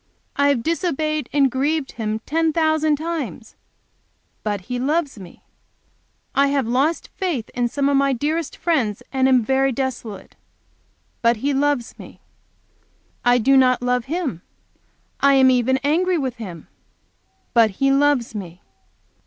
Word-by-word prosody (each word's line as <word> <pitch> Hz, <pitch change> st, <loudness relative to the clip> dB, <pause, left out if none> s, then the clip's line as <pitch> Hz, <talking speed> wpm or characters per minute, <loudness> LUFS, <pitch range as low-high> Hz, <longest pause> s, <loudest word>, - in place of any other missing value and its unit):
I 285 Hz, -, +3 dB
have 275 Hz, -5 st, +1 dB
disobeyed 310 Hz, -2 st, -1 dB
and 275 Hz, -3 st, +3 dB
grieved 280 Hz, +2 st, -1 dB
Him 220 Hz, -1 st, -3 dB
ten 325 Hz, +1 st, +1 dB
thousand 315 Hz, -1 st, +2 dB
times. 290 Hz, -, -5 dB, 0.9 s
But 205 Hz, -2 st, -2 dB
He 245 Hz, +7 st, -5 dB
loves 290 Hz, -2 st, -1 dB
me! 180 Hz, -3 st, -13 dB, 0.9 s
I 280 Hz, 0 st, +3 dB
have 275 Hz, -2 st, 0 dB
lost 270 Hz, +8 st, 0 dB
faith 335 Hz, -, -2 dB
in 245 Hz, -1 st, 0 dB
some 280 Hz, +3 st, -1 dB
of 280 Hz, -, +2 dB
my 275 Hz, 0 st, +3 dB
dearest 300 Hz, +5 st, -2 dB
friends 250 Hz, -, 0 dB
and 265 Hz, 0 st, +3 dB
am 255 Hz, -3 st, +4 dB
very 270 Hz, +3 st, +1 dB
desolate. 245 Hz, -6 st, -5 dB, 0.9 s
But 235 Hz, 0 st, +3 dB
He 280 Hz, +6 st, -1 dB
loves 280 Hz, -3 st, -1 dB
me! -, -, -12 dB, 1.0 s
I 245 Hz, 0 st, +4 dB
do 270 Hz, +3 st, +3 dB
not 255 Hz, -2 st, +4 dB
love 250 Hz, -1 st, 0 dB
Him, 290 Hz, -, -3 dB, 0.8 s
I 280 Hz, 0 st, +4 dB
am 260 Hz, -1 st, +6 dB
even 255 Hz, +1 st, +2 dB
angry 350 Hz, +5 st, +2 dB
with 260 Hz, -5 st, -3 dB
Him! 185 Hz, -8 st, -9 dB, 0.9 s
But 230 Hz, -2 st, +5 dB
He 275 Hz, +8 st, 0 dB
loves 275 Hz, -4 st, +2 dB
me! 180 Hz, -4 st, -8 dB
270 Hz, 145 wpm, -21 LUFS, 240-295 Hz, 1.0 s, am